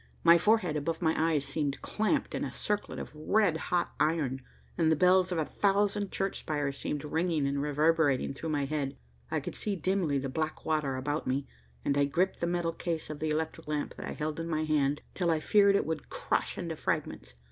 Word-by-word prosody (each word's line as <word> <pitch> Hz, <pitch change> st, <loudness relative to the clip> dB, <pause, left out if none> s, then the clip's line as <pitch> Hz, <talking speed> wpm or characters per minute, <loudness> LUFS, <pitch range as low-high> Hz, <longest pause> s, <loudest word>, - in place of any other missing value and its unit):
My 170 Hz, 0 st, +7 dB
forehead 185 Hz, -4 st, +3 dB
above 160 Hz, +2 st, -1 dB
my 160 Hz, -2 st, +2 dB
eyes 155 Hz, -3 st, +1 dB
seemed 140 Hz, 0 st, -2 dB
clamped 220 Hz, +7 st, 0 dB
in -, -, -2 dB
a -, -, -3 dB
circlet 210 Hz, 0 st, -2 dB
of -, -, -6 dB
red 165 Hz, +3 st, +2 dB
hot 175 Hz, -1 st, +1 dB
iron, 150 Hz, -4 st, +1 dB, 0.3 s
and 160 Hz, -2 st, +3 dB
the -, -, +5 dB
bells 185 Hz, +3 st, +4 dB
of 175 Hz, -, 0 dB
a 160 Hz, -, +1 dB
thousand 200 Hz, +1 st, +1 dB
church 195 Hz, 0 st, -1 dB
spires 145 Hz, -3 st, -2 dB
seemed 145 Hz, 0 st, -3 dB
ringing 160 Hz, 0 st, 0 dB
and 140 Hz, 0 st, 0 dB
reverberating 150 Hz, -2 st, +2 dB
through 160 Hz, +4 st, -5 dB
my 145 Hz, -2 st, 0 dB
head. 140 Hz, -1 st, -2 dB, 0.3 s
I -, -, 0 dB
could -, -, -6 dB
see 205 Hz, -2 st, -2 dB
dimly 180 Hz, -4 st, 0 dB
the 135 Hz, 0 st, -2 dB
black 155 Hz, +4 st, -3 dB
water 150 Hz, -4 st, 0 dB
about 145 Hz, +3 st, -2 dB
me, 135 Hz, +2 st, 0 dB, 0.4 s
and 140 Hz, -, +2 dB
I 140 Hz, -, +4 dB
gripped 175 Hz, +7 st, 0 dB
the 170 Hz, -, 0 dB
metal 175 Hz, -1 st, 0 dB
case 165 Hz, -3 st, -3 dB
of 150 Hz, -, -7 dB
the 155 Hz, -, -1 dB
electric 160 Hz, +1 st, -2 dB
lamp 150 Hz, -1 st, -2 dB
that -, -, -6 dB
I -, -, -4 dB
held 155 Hz, +1 st, -3 dB
in 165 Hz, -, -3 dB
my 155 Hz, -1 st, 0 dB
hand, 145 Hz, -2 st, +1 dB
till 175 Hz, -3 st, 0 dB
I 160 Hz, -1 st, +2 dB
feared 200 Hz, +3 st, +4 dB
it -, -, +2 dB
would 160 Hz, -1 st, -4 dB
crush -, -, -1 dB
into -, -, -3 dB
fragments. 60 Hz, 0 st, -3 dB
155 Hz, 210 wpm, -30 LUFS, 145-175 Hz, 0.4 s, My